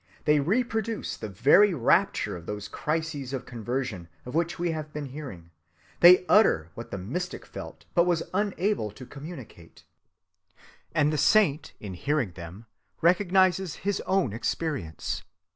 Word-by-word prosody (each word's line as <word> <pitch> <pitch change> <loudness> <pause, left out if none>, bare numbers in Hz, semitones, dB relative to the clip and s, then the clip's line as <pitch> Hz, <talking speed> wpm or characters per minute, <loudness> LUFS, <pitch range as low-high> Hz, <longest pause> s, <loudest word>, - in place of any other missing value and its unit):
They 150 -1 +4
reproduce 220 - -1
the 110 - -7
very 145 - +5
rapture 120 - +2
of 85 -1 -10
those 105 0 -5
crises 150 +1 -3
of 130 -2 -4
conversion 120 -5 -4 0.2
of 125 - -7
which 170 +2 0
we 175 0 0
have 155 -1 -5
been 150 -1 -5
hearing; 125 - -9 0.5
they 180 +1 +8
utter 90 - +4
what 115 - -8
the - - -5
mystic 175 - -5
felt - - -9
but 175 0 +4
was 170 -2 +1
unable 200 - 0
to 115 +5 -11
communicate; 140 - -11 1.1
and 155 -1 +3
the 150 - 0
saint, 155 -3 +3
in 100 -3 -7
hearing 135 +2 -1
them, 85 +5 -10 0.3
recognizes 185 0 +3
his 200 -1 0
own 185 - +1
experience. 115 - -3
150 Hz, 145 wpm, -27 LUFS, 110-180 Hz, 1.1 s, they